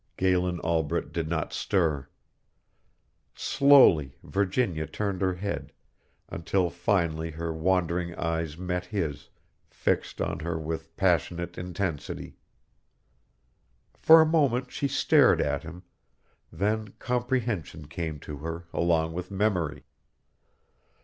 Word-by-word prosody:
Galen 90 -1 +1
Albret 80 -3 -1
did 80 -2 -2
not 80 -2 -2
stir. 80 -9 0 1.3
Slowly 135 - +5
Virginia 95 - 0
turned 100 +4 -3
her 95 -1 +1
head, 100 +3 -4 0.5
until 90 +1 -1
finally 85 -4 0
her 80 +1 -4
wandering 85 0 0
eyes 80 -2 -2
met 90 0 -3
his, 90 -8 -3 0.4
fixed - - -1
on - - -2
her 85 0 -3
with 80 0 -5
passionate 85 0 +1
intensity. 90 -4 -4 1.6
For 160 0 +7
a - - +5
moment 135 -6 +1
she 140 - -1
stared - - +4
at 70 -1 0
him, 85 +3 -10 0.7
then 105 +4 -1
comprehension 120 - -2
came 80 0 -4
to 75 - -7
her 80 +3 -6
along 80 -1 +1
with 90 +1 -5
memory. 95 -6 -1
85 Hz, 110 wpm, -27 LUFS, 80-100 Hz, 1.6 s, For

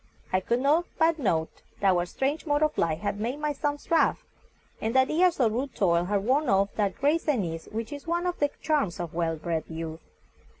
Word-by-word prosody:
I 185 - +4
could 235 +6 0
not 305 +5 +3
but 325 0 +3
note 165 - -1 0.2
that 195 -1 +4
our 175 -1 +1
strange 280 - -2
mode 290 +1 +2
of 305 0 +1
life 165 0 0
had 205 0 -2
made 240 +6 -2
my 300 0 -1
sons 290 +2 -3
rough, 330 - +3 0.6
and 225 +3 -2
that 260 0 +4
years 345 +1 +3
of 235 -4 +3
rude 255 +2 -3
toil 170 -3 +2
had 200 +1 0
worn 270 +3 +2
off 195 +1 +2
that 200 -3 -1
grace 300 +5 +1
and 250 -11 +2
ease 165 -1 -6
which 225 +3 -4
is 285 +2 -9
one 345 +1 0
of 355 -1 -2
the 290 - +2
charms 290 - 0
of 170 -2 -4
well 165 -1 0
bred 160 0 -3
youth. 160 0 -6
235 Hz, 220 wpm, -27 LUFS, 175-295 Hz, 0.6 s, I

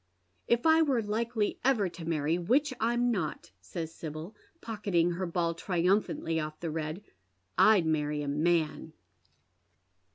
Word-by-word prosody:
" 95 - -44
If 235 +3 +2
I 320 0 +6
were 270 -7 +2
likely 220 +1 -1
ever 245 -7 +3
to 170 -1 -8
marry, 160 +1 0
which 260 - +2
I'm 240 +2 +2
not," 155 - -3
says 160 - -6
Sibyl, 160 +6 -7 0.2
pocketing 200 - 0
her 180 +2 -3
ball 170 0 0
triumphantly 175 -1 0
ofE 155 -1 -4
the 165 -2 -3
red, 155 +4 -4 0.3
" 90 0 -44
I'd 200 -6 +4
marry 150 -1 0
a - - -4
man." 155 +1 0
170 Hz, 150 wpm, -30 LUFS, 155-220 Hz, 0.3 s, I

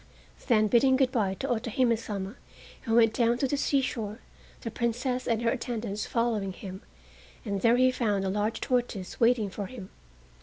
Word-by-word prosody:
Then 215 -3 +4
bidding 260 +4 +4
good 260 -1 +2
by 200 -6 0
to 265 - -4
Otohime 235 0 +1
Sama 205 -3 -5 0.5
he - - -8
went 225 -1 +5
down 235 0 +2
to 270 - +1
the 285 - 0
seashore, 250 -7 -1 0.4
the 230 - -5
Princess 250 +3 -1
and 230 0 0
her 230 - +3
attendants 230 -4 -3
following 225 -5 0
him, 190 +1 -8 0.6
and 200 -3 -2
there 235 +1 +4
he 255 0 +5
found 210 -6 0
a - - 0
large 210 +3 -1
tortoise 240 -7 -2
waiting 230 -4 +3
for 200 +1 -5
him. 200 -6 -10
230 Hz, 175 wpm, -28 LUFS, 205-250 Hz, 0.6 s, went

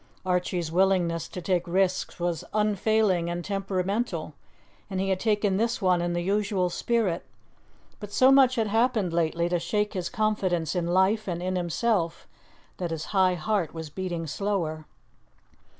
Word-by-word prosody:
Archie's 180 -2 -1
willingness 175 -3 +2
to 180 - -8
take 180 0 0
risks 185 +1 0
was 175 -1 -1
unfailing 210 -4 +2
and 175 0 -4
temperamental, 195 -3 -2 0.6
and 190 -2 -3
he 195 +1 0
had 190 -1 +1
taken 205 -3 +1
this 230 +2 0
one 180 -4 +2
in 175 0 -1
the 175 0 -1
usual 195 -2 0
spirit, 215 -5 0 0.8
but 210 -1 -8
so 260 +5 +5
much 265 -2 +6
had 225 -3 +1
happened 220 -4 +1
lately 170 0 +1
to 175 0 0
shake 210 +5 -1
his 185 -3 -3
confidence 200 -7 0
in 175 -2 -1
life 190 +5 +2
and 175 -1 -3
in 185 0 -1
himself 175 0 -1 0.5
that 175 -2 -3
his 160 -1 -4
high 185 -2 +4
heart 175 0 -1
was 160 -2 -6
beating 175 -1 -4
slower. 160 -2 -2
185 Hz, 155 wpm, -26 LUFS, 175-210 Hz, 0.8 s, much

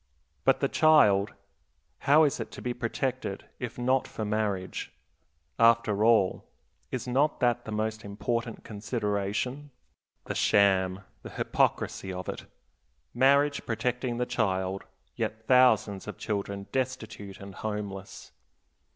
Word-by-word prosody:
But - - +4
the - - +3
child, 105 -11 +4 0.7
how 155 +3 +7
is 145 - +1
it - - -4
to - - -8
be 125 - -1
protected, 120 -3 -3
if 120 -2 -5
not 130 +1 +1
for 110 - -5
marriage? 105 -3 -2 0.7
After 115 -3 +4
all, 110 -5 +3 0.5
is 130 0 -4
not 140 +5 +1
that 120 -1 +1
the 110 - -6
most 110 +1 -2
important 115 +3 -3
consideration? 105 +5 -3 0.6
The - - -3
sham, 95 -2 +3 0.2
the - - -9
hypocrisy 95 - 0
of 90 0 -6
it! - - -6 0.7
Marriage 140 +3 +3
protecting 120 +2 -1
the 125 - 0
child, 95 -4 -1 0.3
yet 110 0 -3
thousands 110 -6 +4
of 105 - -6
children 100 -1 -3
destitute 120 -6 -4
and 100 0 -9
homeless. 100 -2 -6
110 Hz, 125 wpm, -28 LUFS, 100-125 Hz, 0.7 s, how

